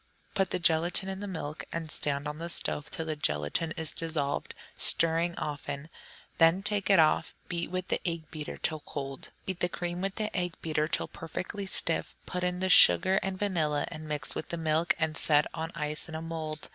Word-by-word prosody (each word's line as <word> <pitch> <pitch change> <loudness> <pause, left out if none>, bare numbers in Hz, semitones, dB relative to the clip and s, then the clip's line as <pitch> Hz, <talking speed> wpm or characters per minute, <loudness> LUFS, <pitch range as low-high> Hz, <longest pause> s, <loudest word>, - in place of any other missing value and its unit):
Put 195 -1 +1
the - - 0
gelatine 175 +2 +3
in 190 - -5
the 205 - -5
milk 155 -5 -5
and 165 -2 -3
stand 145 0 0
on 150 +1 -5
the 170 +1 -4
stove 150 -3 -1
till 160 - -4
the 155 -1 -2
gelatine 75 - 0
is 160 -1 0
dissolved, 155 -4 -2 0.2
stirring 165 +1 +2
often. 145 0 -4 0.5
Then 165 +4 +5
take 205 -2 -1
it 195 - +7
off, 155 -2 +3
and - - -32
beat 170 -1 -2
with 185 +1 -3
the - - 0
egg 165 -3 -3
beater 150 -2 -6
till 155 -2 0
cold. 135 -2 -6
Beat 185 -2 -3
the 180 - +2
cream 175 -1 -3
with 195 0 -1
the 215 -1 -2
egg 180 -2 -1
beater 155 -1 0
till - - -1
perfectly 195 +5 -5
stiff, 165 -3 0
put 180 0 -3
in 180 0 -1
the 190 - +2
sugar 180 - +7
and 190 -1 -3
vanilla, 160 -7 0
and 155 -2 -8
mix 145 -3 0
with - - -5
the 170 - -3
milk, 160 +1 +2
and 160 -1 0
set 150 0 +5
on 160 +1 -4
ice 150 -1 -1
in 160 - -6
a 160 - -4
mould. 160 -2 -4
165 Hz, 210 wpm, -30 LUFS, 150-180 Hz, 0.5 s, it